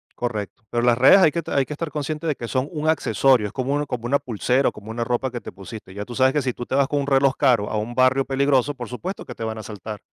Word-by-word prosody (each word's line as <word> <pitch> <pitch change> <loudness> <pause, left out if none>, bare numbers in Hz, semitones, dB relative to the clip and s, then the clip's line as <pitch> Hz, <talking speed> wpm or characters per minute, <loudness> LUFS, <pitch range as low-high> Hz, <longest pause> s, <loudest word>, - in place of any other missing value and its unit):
Correcto, 120 0 -4
pero 120 - 0
las 120 -1 +4
redes 130 +9 +8
hay 185 -5 +5
que 170 - -2
hay 140 - +2
que 150 - -9
estar 155 +1 -4
consciente 150 +2 -4
de 155 - +1
que 120 -2 -7
son 130 +1 -1
un 155 -2 -2
accesorio. 135 -6 +3
Es - - -7
como 130 +2 -2
un 145 0 0
como 120 -3 -4
una 140 +4 +2
pulsera 125 +3 0
o - - -3
como 105 +2 -11
una 115 +1 -2
ropa 125 +2 -1
que 120 -1 -5
te - - -9
pusiste 100 0 -10
ya 100 +1 -5
tú 120 - -9
sabes 130 +1 +3
que 150 - 0
si 130 -1 -1
tú 120 - -7
te - - -3
vas 140 -1 +3
con 145 -1 0
un 140 - -3
reloj 135 -1 +3
caro 120 -7 +2
a - - -2
un 110 +3 -3
barrio 130 +2 +3
peligroso, 140 0 +1
por 120 -3 -7
supuesto 175 - -6
que 125 - -9
te 115 - -6
van 110 0 -3
a - - -6
asaltar. 105 0 -8
130 Hz, 300 wpm, -22 LUFS, 115-140 Hz, -, redes